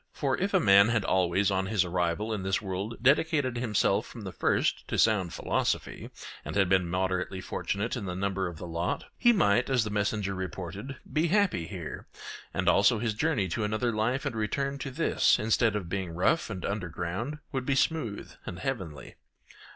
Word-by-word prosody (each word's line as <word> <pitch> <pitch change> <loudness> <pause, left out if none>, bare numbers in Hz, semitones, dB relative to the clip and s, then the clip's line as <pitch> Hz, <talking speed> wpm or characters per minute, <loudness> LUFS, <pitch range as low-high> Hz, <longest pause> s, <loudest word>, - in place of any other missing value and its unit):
For 135 -3 0
if 195 +2 -1
a - - +6
man 100 0 +6
had 115 -3 +1
always 95 +2 +2
on 95 0 0
his 100 -3 +2
arrival 90 +5 -1
in 105 - -3
this 95 0 0
world 100 +3 -4
dedicated 140 -1 +3
himself 115 -4 +1
from - - -10
the - - -6
first - - 0
to - - -2
sound 100 -6 +3
philosophy, - - -2 0.3
and - - -6
had 95 -2 +3
been 90 -2 +2
moderately 95 +1 -1
fortunate 100 +4 -3
in 115 -5 -4
the 90 -1 -4
number 95 0 -1
of 85 -2 -7
the 90 - -7
lot, 85 0 -2
he 240 - +5
might, 120 - +3
as 125 -4 +3
the 105 - -4
messenger 105 -1 -1
reported, 95 - -6 0.2
be 155 +3 +2
happy 185 - +2
here, 90 -5 -7 0.4
and 90 +1 -2
also 100 +5 +5
his 110 0 -1
journey 125 -5 0
to 105 +6 -2
another 110 +3 0
life 115 +5 0
and - - -2
return 140 +6 -2
to 135 - -4
this, 130 - +3
instead 110 0 +2
of 100 -5 -3
being 90 -2 -3
rough 105 - +2
and 95 -4 -5
underground, 100 - -3
would 130 -3 -3
be 135 - +2
smooth 130 -8 -1 0.2
and 90 - -5
heavenly. 95 - -5
100 Hz, 190 wpm, -29 LUFS, 95-120 Hz, 0.4 s, a